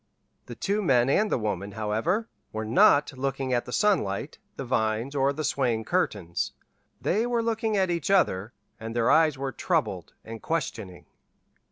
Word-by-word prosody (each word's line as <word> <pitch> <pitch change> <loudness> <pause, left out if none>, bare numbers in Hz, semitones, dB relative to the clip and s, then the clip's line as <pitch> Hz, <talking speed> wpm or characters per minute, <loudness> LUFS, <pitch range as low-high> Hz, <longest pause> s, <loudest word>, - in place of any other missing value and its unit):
The - - -7
two 205 +2 -1
men 135 -7 +3
and 210 +7 +2
the - - +2
woman, 105 -3 -3
however, 110 - -1 0.2
were 110 0 -4
not 140 +5 +4
looking 135 0 -2
at 120 - 0
the - - -8
sunlight, 150 - 0 0.2
the 135 - -5
vines, 115 +2 0
or 140 -1 +2
the 155 +2 -4
swaying 125 -6 0
curtains; 100 - -1 0.5
they 220 +6 0
were 240 -1 0
looking 225 -2 0
at 190 -2 +2
each 170 -1 -2
other, 110 - +2 0.3
and 115 +1 -6
their 120 0 +3
eyes 155 -3 +4
were 135 0 -3
troubled - - -2
and 115 0 -8
questioning. 115 - -4
135 Hz, 165 wpm, -26 LUFS, 110-175 Hz, 0.5 s, not